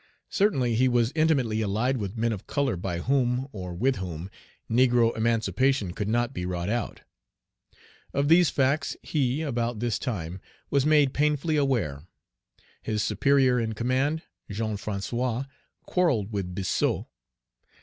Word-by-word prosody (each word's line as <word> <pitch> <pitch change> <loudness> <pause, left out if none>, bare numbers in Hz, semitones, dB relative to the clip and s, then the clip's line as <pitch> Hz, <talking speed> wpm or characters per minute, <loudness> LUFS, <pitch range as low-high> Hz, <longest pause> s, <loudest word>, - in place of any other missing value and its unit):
Certainly, 135 - +2
he 125 +3 +3
was 120 -1 +2
intimately 135 -9 +2
allied 110 +6 0
with 100 0 -4
men 115 +1 +1
of 100 - -8
color 140 -5 0
by 85 -1 -3
whom, 130 +1 +1
or 90 -3 -6
with 130 +7 +1
whom, 90 0 -6 0.4
negro 120 -1 +3
emancipation 115 0 +1
could 100 +2 -3
not 120 +2 0
be 90 - -4
wrought 90 0 -3
out. 120 +1 -3 1.1
Of 140 +1 0
these 170 +1 +6
facts 140 +3 0
he, 140 0 0
about 120 -5 -1
this 120 -3 -1
time, 95 - -4 0.3
was 140 0 +2
made 150 -3 +4
painfully 150 +1 +1
aware. 110 - 0 0.7
His 105 -1 -1
superior 130 +4 +3
in 110 -1 -1
command, 130 +8 0 0.3
Jean 110 +1 -2
François, 115 +5 -2 0.4
quarrelled 135 - +1
with 95 -4 -3
Biassou. 95 -2 0
120 Hz, 140 wpm, -27 LUFS, 105-135 Hz, 1.1 s, these